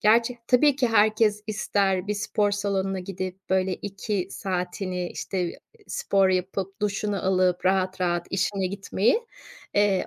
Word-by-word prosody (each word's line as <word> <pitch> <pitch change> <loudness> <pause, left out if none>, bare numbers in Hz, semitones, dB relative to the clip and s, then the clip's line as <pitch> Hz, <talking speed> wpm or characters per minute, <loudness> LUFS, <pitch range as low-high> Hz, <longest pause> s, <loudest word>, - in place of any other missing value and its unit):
gerçi, 230 +3 +3
tabii 265 +2 +5
ki 260 -3 +2
herkes 215 -1 +3
ister, 200 -3 0
bir 210 - -1
spor 205 0 0
salonuna 195 -1 -1
gidip, 185 0 -6
böyle, 190 0 +2
2 195 -1 -3
saatini, 180 -1 -3
işte, 180 -3 -3 0.3
spor 195 -1 +2
yapıp, 190 +2 -2
duşunu 205 -2 -1
alıp, 185 -1 +2
rahat 185 0 +1
rahat 175 -1 0
işine 190 0 0
gitmeyi. 200 - +1 0.5
Eee, 205 -2 +3
195 Hz, 130 wpm, -25 LUFS, 185-210 Hz, 0.5 s, tabii